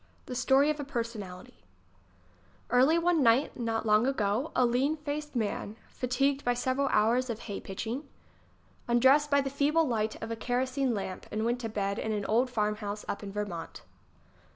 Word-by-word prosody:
The 255 Hz, -, -6 dB
Story 265 Hz, +4 st, +3 dB
of 305 Hz, -, -5 dB
a -, -, -2 dB
Personality 215 Hz, -, -6 dB, 1.1 s
arly 260 Hz, +7 st, +5 dB
one 340 Hz, -2 st, +2 dB
night 245 Hz, +3 st, +3 dB
not 225 Hz, -2 st, -2 dB
long 215 Hz, +3 st, +4 dB
ago, 225 Hz, +1 st, 0 dB
a 250 Hz, -, +4 dB
lean 260 Hz, +6 st, +1 dB
faced 295 Hz, -1 st, -5 dB
man, 215 Hz, -2 st, -2 dB, 0.2 s
fatigued 275 Hz, +3 st, 0 dB
by 245 Hz, 0 st, +1 dB
several 260 Hz, +3 st, 0 dB
hours 240 Hz, +3 st, +2 dB
of 230 Hz, -1 st, -4 dB
hay 200 Hz, -3 st, -5 dB
pitching, 230 Hz, +9 st, -5 dB, 0.8 s
undressed 265 Hz, +5 st, +4 dB
by 280 Hz, -1 st, +4 dB
the 270 Hz, -1 st, -3 dB
feeble 295 Hz, +3 st, +2 dB
light 220 Hz, -3 st, -1 dB
of 225 Hz, -, -6 dB
a -, -, -1 dB
kerosene 255 Hz, +2 st, -1 dB
lamp 190 Hz, -2 st, -5 dB
and 215 Hz, +1 st, -1 dB
went 240 Hz, +1 st, 0 dB
to 225 Hz, -, -3 dB
bed 200 Hz, -1 st, -2 dB
in 220 Hz, -, -2 dB
an 205 Hz, -1 st, -2 dB
old 240 Hz, +5 st, +2 dB
farmhouse 210 Hz, -2 st, -2 dB
up -, -, -3 dB
in 200 Hz, -1 st, -7 dB
Vermont. 195 Hz, -5 st, -5 dB
240 Hz, 175 wpm, -29 LUFS, 215-275 Hz, 1.1 s, arly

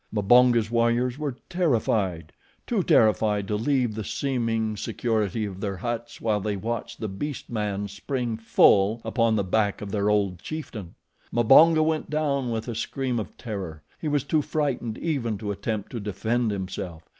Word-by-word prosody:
Mbonga's 115 Hz, +2 st, +4 dB
warriors 120 Hz, +3 st, +1 dB
were 145 Hz, -4 st, -3 dB
terrified 110 Hz, -, 0 dB, 0.3 s
too -, -, 0 dB
terrified 105 Hz, -2 st, +3 dB
to 105 Hz, -, -1 dB
leave 125 Hz, +1 st, +1 dB
the 110 Hz, 0 st, -4 dB
seeming 115 Hz, -3 st, -1 dB
security 110 Hz, -1 st, -1 dB
of 95 Hz, -2 st, -7 dB
their 100 Hz, -3 st, -3 dB
huts 120 Hz, +3 st, -4 dB
while 110 Hz, -2 st, +1 dB
they 105 Hz, +1 st, -2 dB
watched 115 Hz, +3 st, -4 dB
the 110 Hz, -, -3 dB
beast 130 Hz, +10 st, -5 dB
man 105 Hz, -2 st, -2 dB
spring 115 Hz, +4 st, -3 dB
full 110 Hz, -1 st, +4 dB
upon 115 Hz, -3 st, +2 dB
the 100 Hz, -, +1 dB
back 100 Hz, +2 st, +1 dB
of 100 Hz, -1 st, -6 dB
their 105 Hz, 0 st, +1 dB
old 100 Hz, -4 st, +1 dB
chieftain. 110 Hz, -, -7 dB, 0.4 s
Mbonga 155 Hz, +7 st, +6 dB
went 155 Hz, 0 st, -1 dB
down 140 Hz, -4 st, 0 dB
with 115 Hz, 0 st, -3 dB
a 120 Hz, -, -3 dB
scream 125 Hz, +2 st, -2 dB
of 105 Hz, -, -7 dB
terror. 95 Hz, -9 st, -6 dB, 0.2 s
He 155 Hz, -, -4 dB
was 145 Hz, -3 st, +1 dB
too 155 Hz, -, +1 dB
frightened 140 Hz, -7 st, -2 dB
even 125 Hz, -10 st, -1 dB
to 105 Hz, 0 st, -4 dB
attempt 100 Hz, +1 st, -4 dB
to 120 Hz, -, -4 dB
defend 110 Hz, +3 st, -1 dB
himself. 95 Hz, -4 st, -5 dB
110 Hz, 165 wpm, -25 LUFS, 100-125 Hz, 0.4 s, Mbonga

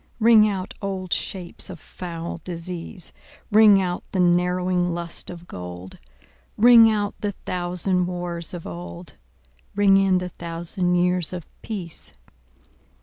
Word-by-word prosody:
Ring 220 Hz, -2 st, +6 dB
out 190 Hz, -2 st, -4 dB
old 190 Hz, -3 st, -2 dB
shapes 180 Hz, -1 st, -3 dB
of 180 Hz, -3 st, -8 dB
foul 170 Hz, -1 st, -7 dB
disease, 175 Hz, +1 st, -5 dB, 0.4 s
Ring 210 Hz, -2 st, +7 dB
out 180 Hz, -2 st, -2 dB
the 190 Hz, -, 0 dB
narrowing 180 Hz, 0 st, +2 dB
lust 170 Hz, -1 st, -4 dB
of 175 Hz, -1 st, -9 dB
gold; 90 Hz, -, -9 dB, 0.6 s
Ring 230 Hz, 0 st, +8 dB
out 205 Hz, -2 st, 0 dB
the 205 Hz, -1 st, -1 dB
thousand 180 Hz, 0 st, 0 dB
wars 175 Hz, -2 st, -3 dB
of 175 Hz, -2 st, -7 dB
old, 85 Hz, 0 st, -8 dB, 0.6 s
Ring 200 Hz, -1 st, +5 dB
in 195 Hz, -1 st, +3 dB
the 180 Hz, 0 st, -3 dB
thousand 175 Hz, +2 st, -2 dB
years 180 Hz, -1 st, +1 dB
of 175 Hz, -3 st, -6 dB, 0.2 s
peace. 185 Hz, -7 st, -6 dB
180 Hz, 130 wpm, -23 LUFS, 170-195 Hz, 0.6 s, Ring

